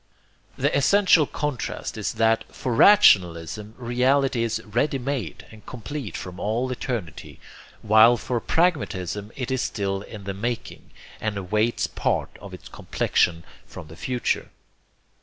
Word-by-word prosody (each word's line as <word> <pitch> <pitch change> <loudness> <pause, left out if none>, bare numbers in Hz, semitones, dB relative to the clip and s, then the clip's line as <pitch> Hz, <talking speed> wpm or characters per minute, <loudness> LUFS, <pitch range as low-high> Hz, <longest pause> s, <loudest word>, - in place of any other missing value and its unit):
The - - +1
essential 165 +1 +4
contrast 145 -5 -4
is 110 -2 -3
that 115 0 +2
for 125 - -3
rationalism 105 - +4
reality 125 +1 +1
is 115 -1 -1
ready 120 +7 0
made 125 - -4
and 110 -1 -15
complete 125 - -6
from 90 0 -8
all 120 +5 -1
eternity, 120 - -5 0.4
while 110 +3 +6
for 120 0 -2
pragmatism 105 - -1
it 130 -1 -4
is 130 -1 0
still 100 -4 -2
in 105 0 -10
the 100 0 -4
making, 115 +4 -5 0.3
and 110 -2 -3
awaits 105 +5 0
part - - -2
of - - -10
its - - -11
complexion 85 -1 0 0.2
from 75 - -11
the 80 - -11
future. 125 +7 -2
115 Hz, 135 wpm, -24 LUFS, 100-130 Hz, 0.4 s, while